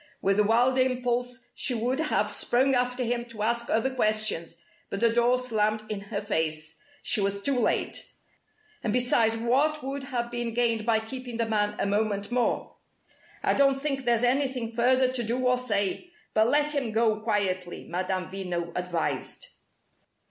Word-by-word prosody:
With 195 +1 +1
a - - +6
wild 245 +5 +3
impulse 250 -1 0
she 250 - 0
would 245 +5 -1
have 320 -1 +1
sprung 265 +3 +3
after 250 0 0
him 240 0 -1
to 230 -3 -6
ask 235 +1 0
other 245 +4 +1
questions, 215 -8 0 0.3
but 195 - -3
the 230 0 +3
door 240 +1 +3
slammed 215 -3 0
in 210 -2 -3
her 200 - -2
face. 160 -6 -2 0.3
She 220 - +2
was 200 0 0
too 265 +4 0
late. - - -1 0.7
And 215 - 0
besides, 235 -2 +3
what 275 +6 +1
would 270 +1 -4
have 240 -3 -3
been 240 -1 -3
gained 230 -2 +1
by 220 -1 +3
keeping 245 +1 -7
the 230 - +1
man 210 -1 0
a - - 0
moment 205 +1 0
more? 245 0 -1 0.7
"I - - +3
don't 275 -1 +3
think 275 -2 -2
there's 235 -1 +2
anything 255 -2 0
further 255 +2 +3
to 255 -1 -1
do 240 +3 -1
or 250 0 +3
say. 205 - -1 0.2
But 220 +1 +4
let 295 +3 +2
him 265 -7 -2
go 220 -1 +2
quietly," 195 -5 -2
Madame 185 +1 -2
Veno 175 -3 -4
advised. 180 -2 -3
235 Hz, 170 wpm, -27 LUFS, 210-250 Hz, 0.7 s, a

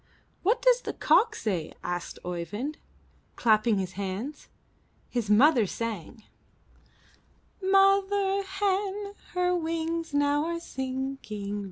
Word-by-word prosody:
'What 450 +6 +1
does - - +5
the - - -4
cock 455 -1 +3
say?*' 180 - -3
asked 175 0 -4
Oeyvind, 185 - -4 0.6
clapping 220 -1 +3
his 190 -1 -2
hands. 200 +9 -5 0.6
His 235 -4 -2
mother 240 +1 +5
sang: 220 0 -5 1.4
''Mother 390 +1 +3
hen, 400 +1 -1 0.2
her 360 0 +2
wings 330 0 -2
now 290 +1 +2
are 335 0 -2
sinking. 260 -8 -4
290 Hz, 100 wpm, -28 LUFS, -, 1.4 s, does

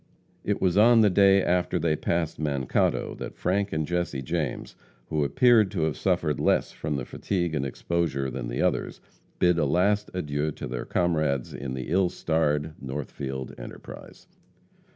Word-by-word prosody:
It 105 - -1
was 95 +1 +2
on 115 +1 +7
the 105 -2 +4
day 100 0 +5
after 90 0 +1
they 80 -2 +1
passed 80 +1 -2
Mankato 70 -4 0
that - - -6
Frank 100 +2 0
and 80 -1 -1
Jesse 85 -5 -2
James, 80 -3 -3 0.4
who 75 -1 +1
appeared 110 - +4
to 95 -4 -3
have 80 -2 0
suffered - - 0
less - - +2
from 75 - -4
the 65 -3 -3
fatigue 85 0 -2
and 75 -3 -1
exposure 70 -1 -2
than 65 -3 -4
the - - -2
others, - - -1 0.4
bid 90 -1 +3
a 75 - +2
last 100 +7 +2
adieu 75 -3 -1
to - - -7
their 60 0 -4
comrades 75 -7 0
in 65 -2 -5
the 65 -1 -5
ill 90 0 +3
starred 80 -3 0
Northfield 65 -1 -5
enterprise. - - -11
80 Hz, 165 wpm, -26 LUFS, 70-90 Hz, 0.4 s, on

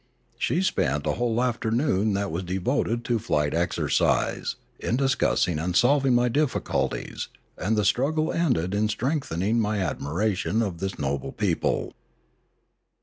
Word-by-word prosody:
She 180 - +1
spent 75 - 0
a - - +2
whole 120 0 0
afternoon 115 -3 +1
that 100 0 -1
was 85 +3 -2
de 90 +1 -3
voted 120 +2 0
to 120 -2 +1
flight 75 -9 0
exercise, 85 +1 +1 0.2
in 115 - -1
discussing 130 - +1
and 85 +2 -2
solving 135 +2 +4
my 120 0 +3
difficulties, 145 +3 -1 0.3
and 110 +4 -1
the 105 - +2
struggle 155 +9 +1
ended 120 - +1
in 105 +1 +1
strengthening 115 - 0
my 105 -1 0
admiration 95 +5 -1
for 105 -4 0
this 95 +3 -5
noble 70 -1 -2
people. - - -1
110 Hz, 140 wpm, -25 LUFS, 90-125 Hz, 0.3 s, solving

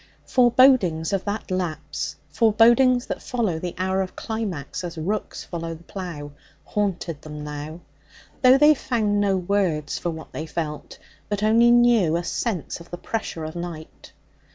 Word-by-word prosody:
Forebodings 240 -10 +4
of 195 - -1
that 205 -1 -4
lapse 160 -5 -3 0.2
forebodings 235 - +4
that - - -5
follow 215 -10 -1
the 175 +1 -5
hour 190 +1 0
of 185 - -5
climax 200 -11 -4
as 170 -1 -6
rooks 200 +7 -3
follow 165 -1 -5
the 165 - -15
plough 170 -7 -7 0.3
haunted 180 -7 -2
them 150 -1 -8
now, 150 +3 -7 0.6
though 255 +1 +7
they 295 +2 +7
found 215 -7 0
no 195 -2 +2
words 180 -5 0
for 175 - -2
what 160 -1 -7
they 155 - -5
felt, 155 -2 -5 0.3
but 205 0 -2
only 230 +2 +5
knew 240 -9 +4
a 175 - -3
sense 185 -3 -3
of 170 - -14
the 175 - -6
pressure 195 -5 -4
of 155 +1 -6
night. 170 -2 -8
185 Hz, 155 wpm, -24 LUFS, 160-220 Hz, 0.6 s, though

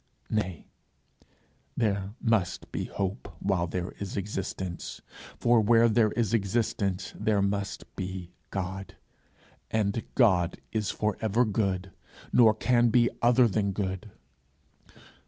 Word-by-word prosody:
Nay, 95 -6 -2 1.1
there 100 -2 0
must 110 -6 0
be - - -2
hope 100 +4 -4
while 95 -3 0
there 90 +2 -3
is 100 -1 -5
existence; 95 -3 -4 0.4
for 120 -1 +4
where 115 +2 +5
there 110 -1 +3
is 115 -2 0
existence 100 -3 0
there 105 -2 +1
must 100 -1 -2
be 95 -2 -5 0.2
God; 95 0 -4 0.7
and 110 0 0
God 95 -9 +3
is 110 -3 -1
for 105 -2 -1
ever 110 +3 +2
good, 95 -3 -1 0.4
nor 110 -3 +6
can 120 +1 +3
be 120 +1 +4
other 120 +1 +5
than 100 -2 0
good. 95 +1 -3
100 Hz, 120 wpm, -28 LUFS, 95-115 Hz, 1.1 s, nor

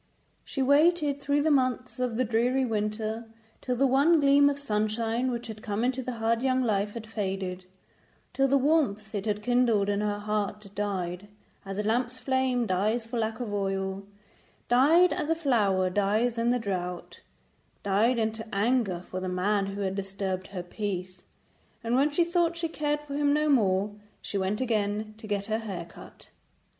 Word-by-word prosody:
She 270 - -2
waited 290 +1 +3
through 285 +1 +1
the 315 - +2
months 255 -2 0
of 250 -3 -1
the 255 - +2
dreary 245 +4 +1
winter 215 0 -2 0.4
till 250 - -1
the 270 +3 +3
one 280 +6 +4
gleam 285 0 +5
of 285 - -2
sunshine 225 0 -1
which 240 -1 -3
had 220 -2 -8
come 210 +1 -2
into 260 +1 0
her 255 0 -4
hard 230 0 0
young 260 0 +2
life 205 -2 0
had 230 -1 -6
faded, 190 -4 -4 0.7
till 270 0 +2
the 275 +1 +4
warmth 260 -8 +1
it 205 0 -3
had 210 0 -1
kindled 235 -4 +2
in 205 0 0
her 205 -1 -1
heart 210 -1 -3
died 190 -2 -3 0.4
as 195 0 -5
a 210 - -1
lamp's 240 +3 0
flame 260 -2 0
dies 215 +4 0
for 235 +1 -4
lack 220 0 -2
of 230 -4 -4
oil; 195 -1 -2 0.7
died 310 +9 +5
as 300 - -3
a 325 - +3
flower 210 - +2
dies 210 +5 +1
in 230 +1 +2
the 250 - +3
drought; 180 -5 -4 0.6
died 210 +5 +2
into 220 0 -1
anger 205 -3 +1
for 185 - -4
the 185 0 -3
man 195 +2 0
who 200 +1 -5
had 190 -1 -1
disturbed 195 -1 -4
her 185 -3 -6
peace, 185 -1 -5 0.6
and 230 +1 -1
when 280 +3 +4
she 305 +4 +2
thought 340 -1 +1
she 335 0 -1
cared 295 -2 -2
for 295 -1 -9
him 285 0 +2
no 300 +1 +2
more 205 -7 +2 0.3
she - - -6
went 195 +4 0
again 215 -3 -1
to 220 - -9
get 200 -1 -1
her 220 +1 -1
hair 195 -6 -5
cut. - - -14
225 Hz, 180 wpm, -28 LUFS, 200-260 Hz, 0.7 s, gleam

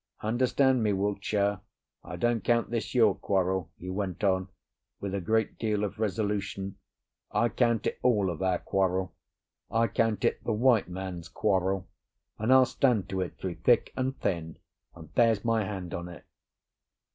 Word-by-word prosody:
Understand 130 +3 +2
me, 105 -2 +2
Wiltshire; 100 0 0 0.4
I - - -7
don't 120 -2 0
count 115 -1 +1
this 110 -1 -3
your 110 -5 +5
quarrel," 95 -3 0
he 90 +1 -6
went 95 0 -3
on, 95 -1 +2 0.5
with 100 -1 -4
a 100 - -1
great 110 +4 0
deal 105 -2 0
of 105 +1 -4
resolution, 100 -2 -2 0.5
"I 115 +3 +2
count 115 -2 +1
it - - -2
all 105 -7 +2
of 85 - -7
our 95 -1 +2
quarrel, 95 0 0 0.6
I 115 +1 +2
count 110 -1 +1
it - - 0
the 115 - 0
White 115 -2 +3
Man's 90 -2 -6
Quarrel, 95 0 0 0.5
and 110 +4 +1
I'll 130 0 +7
stand 125 -7 +1
to 95 -1 -1
it 90 - -5
through 90 -3 -5
thick 120 -2 +3
and 130 +1 -2
thin, 85 -4 -2 0.4
and 80 -3 -12
there's 115 -3 +3
my 115 -2 +2
hand 95 -3 -5
on 85 +1 -5
it." 85 - -12
100 Hz, 165 wpm, -28 LUFS, 95-115 Hz, 0.6 s, I'll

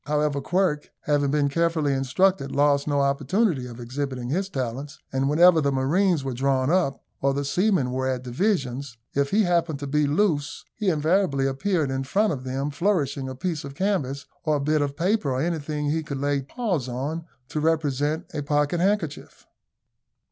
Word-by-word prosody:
However, 150 -1 0
Quirk, 175 -2 0
having 145 -1 +1
been 145 0 +2
carefully 160 -1 +1
instructed, 135 +3 +1
lost 140 0 +3
no 145 -1 +2
opportunity 140 - +1
of 120 0 -10
exhibiting 125 0 -4
his 190 +7 -1
talents; 135 0 -4 0.2
and 135 +1 +1
whenever 165 +2 +6
the 140 -1 +1
marines 155 +5 +2
were 135 -1 -3
drawn 135 +2 +1
up, 170 -7 +1 0.2
or 135 0 +2
the 140 0 -1
seamen 180 -3 +1
were 130 +1 -1
at 130 -1 -2
divisions, 135 - -1 0.2
if 140 0 +1
he 215 +5 +3
happened 170 -4 +1
to 145 - -6
be 150 +1 +1
loose, 150 -2 0
he 210 -3 0
invariably 155 -3 +2
appeared 150 +2 0
in 135 0 -1
front 200 +8 +1
of 130 -2 -6
them 135 +3 -2
flourishing 145 -5 0
a 130 - -6
piece 160 +2 -3
of 140 0 -8
canvas, 145 -8 -1 0.2
or 155 -2 +2
a - - 0
bit 150 +2 +1
of 140 -1 -2
paper, 185 -2 +1
or 130 - -1
anything 150 -2 -1
he 160 +1 0
could 145 -3 -5
lay 140 0 0
paws 170 - -2
on 145 +7 -3 0.2
to 155 - -2
represent 155 0 0
a 150 - -2
pocket 145 +3 +1
handkerchief. 185 -5 -1
145 Hz, 180 wpm, -25 LUFS, 135-170 Hz, 0.2 s, whenever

